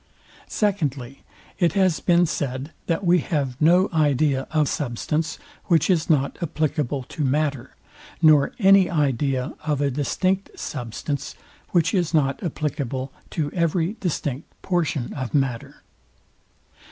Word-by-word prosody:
Secondly, 145 Hz, -, -2 dB, 0.4 s
It 175 Hz, -3 st, +3 dB
has 190 Hz, -5 st, +2 dB
been 175 Hz, 0 st, +3 dB
said, 140 Hz, -2 st, -3 dB, 0.2 s
that 170 Hz, +3 st, 0 dB
we 175 Hz, +1 st, +5 dB
have 140 Hz, -5 st, -2 dB
no 175 Hz, +5 st, +5 dB
idea 145 Hz, -3 st, +2 dB
of 155 Hz, -2 st, +2 dB
substance, 150 Hz, +5 st, -2 dB, 0.3 s
which 165 Hz, 0 st, +3 dB
is 170 Hz, -1 st, +1 dB
not 140 Hz, -3 st, +1 dB
applicable 150 Hz, -4 st, -1 dB
to 150 Hz, +4 st, -5 dB
matter; 140 Hz, -2 st, -1 dB, 0.4 s
nor 155 Hz, -4 st, +5 dB
any 195 Hz, -3 st, +5 dB
idea 135 Hz, -4 st, 0 dB
of 150 Hz, -2 st, -1 dB
a 140 Hz, -1 st, +1 dB
distinct 185 Hz, +8 st, -1 dB
substance, 135 Hz, +2 st, -5 dB, 0.3 s
which 175 Hz, 0 st, +2 dB
is 175 Hz, -4 st, +1 dB
not 140 Hz, -3 st, +1 dB
applicable 140 Hz, -5 st, -3 dB, 0.2 s
to 145 Hz, -3 st, -2 dB
every 170 Hz, +2 st, 0 dB
distinct 145 Hz, -5 st, -3 dB
portion 160 Hz, -8 st, -1 dB
of 130 Hz, 0 st, -4 dB
matter. 135 Hz, -5 st, -2 dB
150 Hz, 125 wpm, -23 LUFS, 135-170 Hz, 0.4 s, we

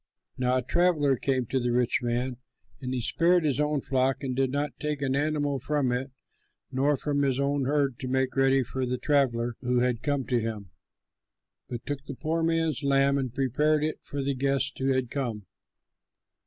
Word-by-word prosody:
"Now 125 Hz, 0 st, +1 dB
a 130 Hz, -, -1 dB
traveller 155 Hz, -2 st, +2 dB
came 130 Hz, 0 st, 0 dB
to 130 Hz, -, +2 dB
the 120 Hz, -1 st, 0 dB
rich 125 Hz, 0 st, +2 dB
man; 125 Hz, +1 st, -1 dB, 0.4 s
and 125 Hz, -, -4 dB
he 130 Hz, -1 st, -1 dB
spared 170 Hz, +8 st, +3 dB
his 145 Hz, -3 st, 0 dB
own 150 Hz, -1 st, +1 dB
flock 130 Hz, 0 st, 0 dB
and 130 Hz, -2 st, -2 dB
did 135 Hz, 0 st, +1 dB
not 145 Hz, +2 st, -3 dB
take 150 Hz, -1 st, -2 dB
an 135 Hz, -1 st, 0 dB
animal 145 Hz, -1 st, 0 dB
from 140 Hz, -1 st, +1 dB
it 125 Hz, +2 st, -2 dB, 0.6 s
nor 140 Hz, +2 st, +2 dB
from 145 Hz, +1 st, 0 dB
his 135 Hz, -2 st, +1 dB
own 140 Hz, -1 st, +1 dB
herd 140 Hz, -3 st, 0 dB
to 130 Hz, -, -4 dB
make 130 Hz, 0 st, 0 dB
ready 135 Hz, 0 st, +3 dB
for 130 Hz, +2 st, -4 dB
the 125 Hz, 0 st, -1 dB
traveller 120 Hz, -5 st, +1 dB
who 125 Hz, -1 st, +1 dB
had 125 Hz, -2 st, 0 dB
come 145 Hz, -3 st, -1 dB
to 125 Hz, -2 st, +1 dB
him, 110 Hz, -5 st, -5 dB, 1.0 s
but 120 Hz, -1 st, -6 dB
took 140 Hz, -1 st, -4 dB
the 140 Hz, -, -6 dB
poor 160 Hz, +4 st, -1 dB
man's 165 Hz, -3 st, +1 dB
lamb 140 Hz, 0 st, +3 dB
and 130 Hz, -3 st, -4 dB
prepared 150 Hz, +3 st, +2 dB
it 155 Hz, 0 st, -1 dB
for 140 Hz, -1 st, -4 dB
the 140 Hz, +1 st, 0 dB
guest 135 Hz, 0 st, 0 dB
who 135 Hz, 0 st, +1 dB
had 130 Hz, -2 st, 0 dB
come." 115 Hz, -8 st, -3 dB
135 Hz, 195 wpm, -27 LUFS, 125-145 Hz, 1.0 s, spared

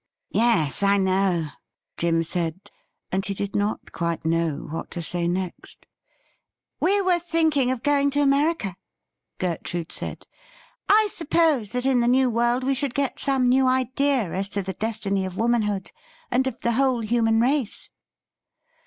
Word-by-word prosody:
'Yes, 180 Hz, -, +2 dB
I 200 Hz, 0 st, +4 dB
know,' 185 Hz, -4 st, +1 dB, 0.5 s
Jim 165 Hz, -1 st, +1 dB
said, 170 Hz, +2 st, -4 dB, 0.4 s
and 190 Hz, +1 st, 0 dB
he 200 Hz, -, -3 dB
did 200 Hz, +1 st, -4 dB
not 205 Hz, +1 st, -2 dB
quite 170 Hz, 0 st, -3 dB
know 165 Hz, -1 st, 0 dB
what 165 Hz, -, -5 dB
to -, -, -2 dB
say 170 Hz, +2 st, -1 dB
next. 180 Hz, 0 st, -5 dB, 0.5 s
' -, -, -54 dB
We 400 Hz, +2 st, +3 dB
were 365 Hz, -2 st, +2 dB
thinking 320 Hz, -6 st, +1 dB
of 255 Hz, -2 st, -2 dB
going 285 Hz, -1 st, +3 dB
to -, -, +4 dB
America,' 280 Hz, -, +1 dB, 0.6 s
Gertrude 175 Hz, -1 st, -3 dB
said. -, -, -4 dB, 0.4 s
' -, -, -25 dB, 0.3 s
I 430 Hz, +1 st, +5 dB
suppose 310 Hz, -, +1 dB
that 250 Hz, +1 st, -2 dB
in 265 Hz, -2 st, +3 dB
the 235 Hz, -, +2 dB
New 255 Hz, 0 st, +3 dB
World 240 Hz, +2 st, +1 dB
we 270 Hz, +1 st, +1 dB
should 270 Hz, -1 st, -2 dB
get 280 Hz, -2 st, -1 dB
some 265 Hz, -3 st, +2 dB
new 260 Hz, +1 st, +4 dB
ideas 260 Hz, -4 st, +1 dB
as 195 Hz, +1 st, -2 dB
to 200 Hz, 0 st, -2 dB
the 190 Hz, +1 st, -4 dB
destiny 205 Hz, -1 st, -1 dB
of 185 Hz, -1 st, -5 dB
womanhood 215 Hz, -5 st, 0 dB, 0.4 s
and 260 Hz, +2 st, +2 dB
of 255 Hz, -2 st, -5 dB
the 235 Hz, -, +1 dB
whole 255 Hz, 0 st, +2 dB
human 225 Hz, 0 st, +2 dB
race.' 255 Hz, -1 st, 0 dB
230 Hz, 160 wpm, -24 LUFS, 190-265 Hz, 0.6 s, I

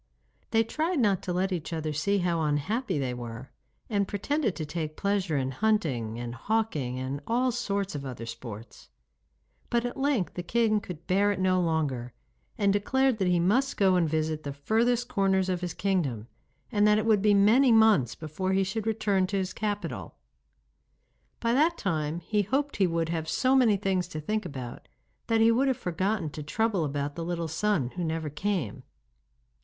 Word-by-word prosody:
They 225 Hz, 0 st, +3 dB
tried 315 Hz, +9 st, -1 dB
not 205 Hz, -8 st, +2 dB
to 180 Hz, -, -4 dB
let 185 Hz, +2 st, 0 dB
each 175 Hz, -3 st, -3 dB
other 155 Hz, -2 st, -2 dB
see 200 Hz, +7 st, +1 dB
how 175 Hz, -3 st, 0 dB
unhappy 155 Hz, -, 0 dB
they 130 Hz, -3 st, -1 dB
were, 120 Hz, +1 st, -7 dB, 0.4 s
and 200 Hz, -3 st, 0 dB
pretended 220 Hz, -, -1 dB
to 155 Hz, -, -4 dB
take 155 Hz, 0 st, -4 dB
pleasure 195 Hz, -6 st, 0 dB
in 130 Hz, -1 st, -1 dB
hunting 135 Hz, -, 0 dB
and 120 Hz, 0 st, -5 dB
hawking 150 Hz, -, -1 dB
and 130 Hz, +2 st, -4 dB
all 250 Hz, +2 st, +2 dB
sorts 200 Hz, -5 st, -2 dB
of 145 Hz, -2 st, -5 dB
other 125 Hz, -4 st, -6 dB
sports; 115 Hz, -2 st, -9 dB, 0.8 s
but 235 Hz, 0 st, +1 dB
at 245 Hz, -, -3 dB
length 270 Hz, -8 st, 0 dB
the 180 Hz, -, -4 dB
king 215 Hz, +3 st, +2 dB
could 180 Hz, -5 st, -9 dB
bear 200 Hz, +2 st, +3 dB
it 200 Hz, -, -3 dB
no 185 Hz, 0 st, +2 dB
longer, 145 Hz, -8 st, -1 dB, 0.4 s
and 200 Hz, -1 st, +3 dB
declared 265 Hz, +4 st, +1 dB
that 190 Hz, -, +1 dB
he 180 Hz, -1 st, +3 dB
must 235 Hz, +11 st, +2 dB
go 190 Hz, -2 st, +4 dB
and 170 Hz, -3 st, +2 dB
visit 155 Hz, 0 st, -1 dB
the 140 Hz, -2 st, -5 dB
furthest 230 Hz, -, +1 dB
corners 195 Hz, -4 st, +1 dB
of 180 Hz, -1 st, -1 dB
his 175 Hz, -2 st, -4 dB
kingdom, 155 Hz, -, -1 dB, 0.5 s
and 205 Hz, 0 st, +3 dB
that 210 Hz, 0 st, +5 dB
it 215 Hz, -, 0 dB
would 215 Hz, -3 st, +4 dB
be 205 Hz, 0 st, +4 dB
many 230 Hz, +6 st, +5 dB
months 220 Hz, -, +5 dB
before 165 Hz, +5 st, -3 dB
he 195 Hz, 0 st, +3 dB
should 210 Hz, +3 st, -3 dB
return 205 Hz, -4 st, +1 dB
to 200 Hz, +1 st, -2 dB
his 190 Hz, -1 st, -2 dB
capital. 205 Hz, -1 st, -4 dB, 1.2 s
By 230 Hz, 0 st, +1 dB
that 315 Hz, +6 st, +3 dB
time 160 Hz, -3 st, -2 dB
he 210 Hz, +2 st, 0 dB
hoped 275 Hz, +8 st, -1 dB
he 195 Hz, -2 st, +3 dB
would 165 Hz, -1 st, -1 dB
have 160 Hz, -1 st, -2 dB
so 260 Hz, +9 st, +2 dB
many 235 Hz, -6 st, +4 dB
things 190 Hz, -3 st, 0 dB
to 155 Hz, -4 st, -6 dB
think 210 Hz, +5 st, -2 dB
about 130 Hz, -5 st, -8 dB, 0.4 s
that 225 Hz, -1 st, +2 dB
he 225 Hz, +1 st, +6 dB
would 260 Hz, +4 st, +2 dB
have 260 Hz, -3 st, +1 dB
forgotten 185 Hz, -1 st, -1 dB
to 150 Hz, -, -7 dB
trouble 195 Hz, +3 st, 0 dB
about 145 Hz, 0 st, -2 dB
the 165 Hz, -, -5 dB
little 170 Hz, -1 st, -2 dB
son 160 Hz, -4 st, 0 dB
who 180 Hz, -, -4 dB
never 160 Hz, -2 st, -2 dB
came. 175 Hz, -, -2 dB
190 Hz, 190 wpm, -28 LUFS, 155-215 Hz, 1.2 s, he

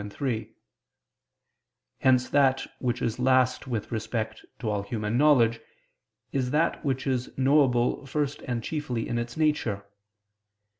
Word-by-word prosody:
2, 105 Hz, -, -6 dB
3); 115 Hz, -1 st, -3 dB, 1.4 s
hence 125 Hz, -1 st, +3 dB
that 135 Hz, -2 st, +3 dB
which 120 Hz, -1 st, -1 dB
is 115 Hz, +1 st, -1 dB
last 130 Hz, 0 st, +2 dB
with 115 Hz, -5 st, -3 dB
respect 110 Hz, -1 st, -3 dB
to 120 Hz, -, -5 dB
all 105 Hz, -1 st, 0 dB
human 105 Hz, +1 st, -3 dB
knowledge, 120 Hz, -5 st, +4 dB, 0.7 s
is 130 Hz, -2 st, 0 dB
that 155 Hz, +5 st, +1 dB
which 130 Hz, -3 st, -1 dB
is 130 Hz, -2 st, -1 dB
knowable 130 Hz, -2 st, +3 dB
first 145 Hz, +1 st, -2 dB
and 120 Hz, -2 st, -2 dB
chiefly 130 Hz, -7 st, -3 dB
in 120 Hz, -, -1 dB
its 120 Hz, +3 st, -5 dB
nature. 120 Hz, -11 st, 0 dB
125 Hz, 135 wpm, -27 LUFS, 115-135 Hz, 1.4 s, knowledge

